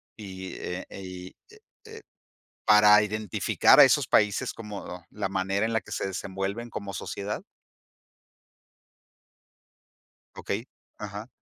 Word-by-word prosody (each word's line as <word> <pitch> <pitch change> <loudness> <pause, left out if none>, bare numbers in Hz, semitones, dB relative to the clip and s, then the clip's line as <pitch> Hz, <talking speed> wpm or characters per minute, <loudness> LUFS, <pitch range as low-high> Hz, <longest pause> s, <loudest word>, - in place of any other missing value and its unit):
Y, 95 -3 -8
eh, 90 +1 -5
y 90 -1 -9 0.2
e 440 - -17 0.2
e, 445 0 -11 0.6
¿para 105 0 +7
identificar 105 -1 +4
a - - +12
esos - - +4
países 105 -1 +2
como 100 -5 -8
la 105 -2 -3
manera 95 +2 -1
en 115 - -2
la 110 - +1
que - - -15
se - - -2
desenvuelven 95 +4 -4
como 100 -3 -6
sociedad? 100 +2 -4 3.0
Okey. 110 +5 -4 0.3
Ajá. 105 +1 -7
100 Hz, 115 wpm, -27 LUFS, 95-105 Hz, 3.0 s, a